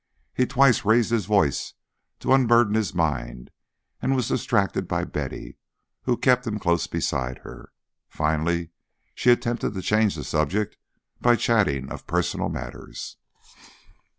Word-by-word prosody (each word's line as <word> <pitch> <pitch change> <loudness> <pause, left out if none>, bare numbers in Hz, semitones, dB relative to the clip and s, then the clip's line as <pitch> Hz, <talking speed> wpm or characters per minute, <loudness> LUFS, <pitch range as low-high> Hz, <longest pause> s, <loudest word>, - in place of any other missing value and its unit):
He 125 - +1
twice 135 -1 +4
raised 110 +2 +3
his 110 -6 0
voice 100 -10 +1 0.5
to - - +2
unburden 120 -4 +4
his 110 -5 0
mind, 70 -7 -2 0.5
and 135 - +1
was 125 -3 0
distracted 100 -6 0
by - - -1
Betty, - - -6 0.5
who 120 - +1
kept 125 -1 +2
him 105 -1 -2
close 85 -4 0
beside 65 -1 -2
her. - - -11 0.4
Finally 80 +2 -1 0.4
she 125 - +1
attempted 120 -3 +1
to 95 - -3
change 105 -1 +2
the - - -5
subject 95 +8 -1 0.5
by 120 0 +5
chatting 100 - +1
of - - -8
personal - - -1
matters. - - -7
105 Hz, 135 wpm, -24 LUFS, 80-120 Hz, 0.5 s, by